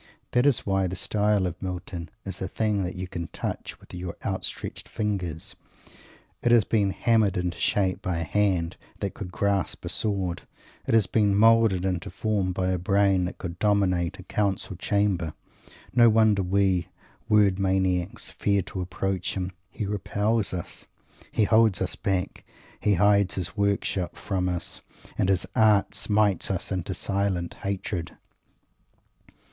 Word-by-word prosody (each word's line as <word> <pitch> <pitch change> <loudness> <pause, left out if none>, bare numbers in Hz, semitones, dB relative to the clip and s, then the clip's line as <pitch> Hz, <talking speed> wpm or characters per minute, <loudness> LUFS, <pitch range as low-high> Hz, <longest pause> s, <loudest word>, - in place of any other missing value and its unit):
That 125 +3 +3
is 135 -5 +2
why 95 -1 +1
the 90 - -4
style 105 0 +1
of 90 0 -4
Milton 90 -2 -5 0.2
is 95 -2 -6
a 95 - -1
thing 105 0 0
that 90 +1 -4
you 90 0 -4
can 85 -1 -5
touch - - -5
with - - -16
your 90 -1 -6
outstretched - - -4
fingers. 95 -7 -3 0.9
It 120 - +2
has 120 -3 +6
been 105 -2 +1
hammered 105 -1 +2
into 90 -1 -2
shape 95 -3 +1
by 90 -2 -1
a 85 - -1
hand 90 -1 +1 0.2
that 100 -3 -2
could 90 -3 -7
grasp 100 0 -1
a - - -3
sword; 95 -4 -1 0.5
it - - +3
has 110 -3 +5
been 100 +1 +2
moulded 110 -3 +5
into 90 -3 -2
form 100 0 -1
by 90 0 -1
a 90 -1 0
brain 100 0 +3
that 90 - -5
could 85 -1 -6
dominate 100 -4 +2
a 95 - -10
council 100 0 -1
chamber. 95 -4 0 0.6
No 120 -1 +7
wonder 110 -2 +4
we 95 -1 +1 0.4
word 100 -3 +4
maniacs 95 -1 0
fear 100 -2 +1
to 95 - -5
approach 95 0 -2
him. 90 0 -2 0.2
He 105 - -4
repels 105 +2 0
us; 90 -2 -5 0.4
he 110 - +2
holds 110 -3 +4
us - - -1
back; 95 -2 -2 0.4
he 105 -1 +2
hides 100 +1 +3
his 90 -2 -3
work 100 -1 +1
shop 90 -3 -2
from 95 -2 -1
us; 90 -1 -4 0.3
and 95 - +1
his 95 -2 +2
art 105 -2 +4
smites 105 -1 +1
us 95 0 -2
into 95 0 -2
silent 95 -2 -1
hatred. 95 -3 -3
95 Hz, 160 wpm, -26 LUFS, 90-105 Hz, 0.9 s, No